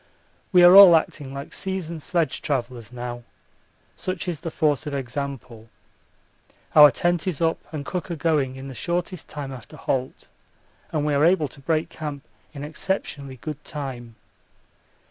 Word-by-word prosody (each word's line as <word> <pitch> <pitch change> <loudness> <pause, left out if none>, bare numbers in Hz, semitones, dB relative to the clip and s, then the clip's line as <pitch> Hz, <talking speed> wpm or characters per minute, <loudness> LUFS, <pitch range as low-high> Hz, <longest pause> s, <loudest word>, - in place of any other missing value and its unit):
We 180 -3 +6
are 175 +1 +9
all 195 -4 +11
acting 150 -3 -1
like 140 +1 -7
seasoned 180 -4 -3
sledge 170 0 -1
travellers 120 -4 -3
now, 120 -1 -6 0.7
such 185 -1 -4
is 170 -4 -3
the 165 - -5
force 155 -2 0
of 145 - -3
example. 130 -4 -6 1.1
Our 150 -1 +10
tent 175 +2 0
is 175 -7 -2
up 165 -1 +1
and 150 -3 -5
cooker 180 -1 -4
going 145 -4 0
in 135 +1 -8
the 135 - -7
shortest 175 +5 -3
time 145 -2 -6
after 125 -4 -11
halt, 130 -1 -3 0.6
and 150 -2 -1
we 150 - +1
are 140 +1 +3
able 165 -3 +3
to 140 - -13
break 155 +2 0
camp 145 -3 -6 0.3
in 145 -2 -8
exceptionally 145 -4 -3
good 150 +3 -7
time. 130 -6 -7
150 Hz, 155 wpm, -24 LUFS, 135-170 Hz, 1.1 s, all